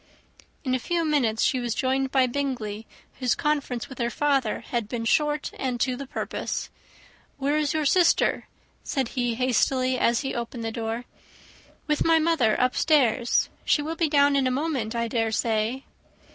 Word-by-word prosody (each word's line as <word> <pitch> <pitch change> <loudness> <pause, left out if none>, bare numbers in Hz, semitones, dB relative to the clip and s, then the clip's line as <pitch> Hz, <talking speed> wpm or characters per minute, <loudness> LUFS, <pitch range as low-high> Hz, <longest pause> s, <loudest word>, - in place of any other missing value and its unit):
In 260 -3 -1
a 255 - +1
few 335 +5 -1
minutes 250 -8 +1
she 260 - +2
was 240 -2 -2
joined 265 0 0
by 260 -1 +3
Bingley, 240 -5 -3 0.3
whose 250 -2 +1
conference 285 -5 -1
with 265 - -11
her 235 -1 0
father 275 -4 0
had 235 -4 -3
been 235 -2 -3
short 295 +4 +1
and 255 -2 -2
to 255 +1 +1
the 275 +1 -7
purpose. - - -4 0.7
"Where 285 +2 0
is 305 -1 0
your 310 -1 0
sister?" 345 +4 +3 0.4
said 265 -4 -2
he 245 -2 -1
hastily, 255 +1 +1
as 235 0 +2
he 270 - -3
opened 235 0 -5
the 225 - -2
door. 225 +1 -4 0.8
"With 300 -2 +1
my 330 0 +4
mother 315 -9 +2
upstairs. 255 -2 +2 0.2
She 295 - +2
will 320 +2 -3
be 330 -1 +1
down 285 -1 +4
in 270 -2 +2
a - - +2
moment, 255 -5 -2
I 235 0 0
dare 225 -1 0
say." 225 +4 0
260 Hz, 170 wpm, -25 LUFS, 235-290 Hz, 0.8 s, my